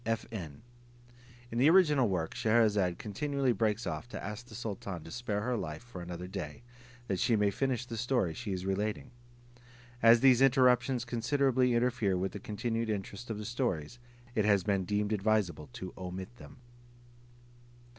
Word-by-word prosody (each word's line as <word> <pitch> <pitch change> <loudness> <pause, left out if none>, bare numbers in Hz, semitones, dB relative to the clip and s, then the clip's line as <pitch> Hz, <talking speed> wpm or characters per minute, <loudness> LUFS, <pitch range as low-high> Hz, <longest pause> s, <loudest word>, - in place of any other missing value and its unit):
[FN: 110 - -4 0.9
In 115 - -2
the 140 +5 +6
original 150 - +5
work 85 -4 -1
Scheherazade 105 -5 +2
continually 135 +5 -1
breaks 110 -1 0
off 120 - -4
to - - -7
ask 105 +4 -6
the 110 - -11
sultan 100 -6 -5
to 80 - -10
spare 110 -4 -2
her 125 +3 -1
life 80 -4 -5
for 120 -7 -9
another 90 0 -6
day, 90 -1 -6 0.4
that 95 -4 -1
she 115 - +3
may 105 -1 +2
finish 130 +3 -1
the 115 -1 -6
story 120 -7 0
she 100 - -5
is 95 -1 -3
relating. 105 +5 -2 0.9
As 115 0 +7
these 130 -2 +6
interruptions 125 -2 +4
considerably 125 +1 +2
interfere 115 -5 +1
with 95 +1 -1
the 105 - -7
continued 115 +2 -2
interest 105 +3 -4
of 110 - -3
the 105 - -6
stories, 120 - -2 0.3
it 110 - +1
has 100 -3 +3
been 100 -2 0
deemed 105 +2 0
advisable 100 -7 0
to 95 - -7
omit 95 +4 -7
them. - - -13
110 Hz, 165 wpm, -31 LUFS, 95-120 Hz, 0.9 s, As